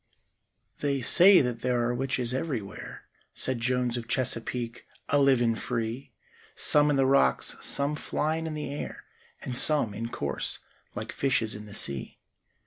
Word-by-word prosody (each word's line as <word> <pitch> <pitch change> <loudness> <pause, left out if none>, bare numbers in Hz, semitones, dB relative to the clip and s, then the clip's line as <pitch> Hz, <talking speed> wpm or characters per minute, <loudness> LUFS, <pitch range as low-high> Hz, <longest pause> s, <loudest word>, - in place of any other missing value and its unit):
"They 140 -2 -1
say 185 +9 +7
that 120 -3 -3
there 125 -1 0
are 120 - -1
witches 125 -1 -2
everywhere," 130 -8 -5 0.3
Said 130 -2 0
Jones 125 0 0
of 115 -1 -6
Chesapeake, 120 -1 -2 0.2
"a 145 - +3
livin' 125 -4 +3
free; 115 +3 -4 0.5
Some 150 0 +4
in 145 - +2
the 135 -1 +3
rocks, 135 +1 +2
some 140 +2 0
flyin' 160 +2 -2
in 155 - -5
the 150 -2 -5
air, 145 - -7 0.4
And 125 - -4
some, 140 -5 +3
in 115 +3 -5
course, 70 -10 -2 0.4
like - - -5
fishes 125 -5 0
in 105 0 -9
the 105 - -9
sea. 70 -8 -3
125 Hz, 150 wpm, -27 LUFS, 115-140 Hz, 0.5 s, say